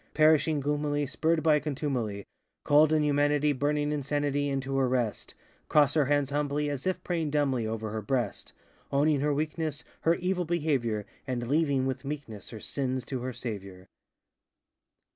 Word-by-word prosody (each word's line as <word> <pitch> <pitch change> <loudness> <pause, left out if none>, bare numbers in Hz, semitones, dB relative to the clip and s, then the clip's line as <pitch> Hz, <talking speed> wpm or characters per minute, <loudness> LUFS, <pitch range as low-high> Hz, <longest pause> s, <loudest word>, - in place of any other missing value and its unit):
Perhishing 155 -1 +4
gloomily, 145 +1 0
Spurred 160 +3 0
by 155 -2 +5
contumely, 130 -9 -3 0.4
Cold 150 +1 +5
inhumanity, 150 -1 +3
Burning 145 +2 0
insanity, 145 0 0
Into 135 0 -2
her 130 -2 +2
rest, 120 -4 -2
ŌĆö - - -33
Cross 145 -2 +5
her 150 -3 +3
hands 145 0 +1
humbly, 145 0 0
As 140 +3 -4
if 185 -1 -1
praying 165 -4 -1
dumbly, 135 -6 +1
Over 110 -1 -3
her 110 0 -3
breast! 120 +3 -2 0.4
Owning 145 +1 +3
her 145 +2 +1
weakness, 155 0 -2 0.2
Her 165 +1 +3
evil 180 0 -1
behavior, 140 -11 0 0.2
And 120 -2 -2
leaving, 140 -2 +2
with 130 +1 -3
meekness, 135 -8 -6
Her 110 - -8
sins 130 +1 -2
to 130 -3 -4
her 130 +1 -3
Saviour! 100 -6 -7
145 Hz, 155 wpm, -29 LUFS, 130-150 Hz, 0.4 s, by